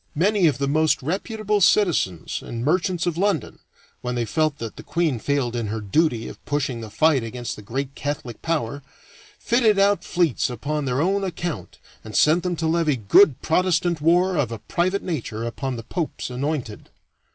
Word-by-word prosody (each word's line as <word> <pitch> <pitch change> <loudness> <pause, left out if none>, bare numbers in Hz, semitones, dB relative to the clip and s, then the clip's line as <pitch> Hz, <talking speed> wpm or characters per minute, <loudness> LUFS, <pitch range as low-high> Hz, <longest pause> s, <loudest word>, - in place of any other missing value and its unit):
Many 190 +3 +3
of 150 - +1
the 140 0 -1
most 155 0 +2
reputable 210 - -1
citizens 165 - +2
and 115 +1 -5
merchants 180 +2 +1
of 170 -1 -1
London, 195 - 0 0.4
when 125 0 -3
they 120 -1 0
felt 155 +3 0
that 115 -2 -6
the - - -9
queen 160 -8 0
failed 130 -1 -1
in 115 -2 -2
her 110 +2 -3
duty 115 - +1
of - - -11
pushing 140 -5 -2
the 110 - -7
fight 155 +3 +3
against 120 +1 -5
the - - -10
great 135 +6 -4
Catholic 145 -5 -5
Power, 145 -5 -2 0.6
fitted 230 -4 +2
out 200 -2 +3
fleets 170 -8 +1
upon 145 +5 -3
their 130 +1 0
own 195 +3 +1
account 175 -3 -4 0.3
and 110 -1 -9
sent 160 +4 +4
them 180 -1 -2
to 165 - -3
levy 160 -2 +2
good 125 - +4
Protestant 170 -1 +1
war 175 +3 +3
of 130 -6 0
a 115 - -4
private 185 - -1
nature 120 -10 -4
upon 130 +2 -3
the 115 - -7
Pope's 150 +1 -4
anointed. 130 -4 -4
150 Hz, 180 wpm, -23 LUFS, 125-175 Hz, 0.6 s, sent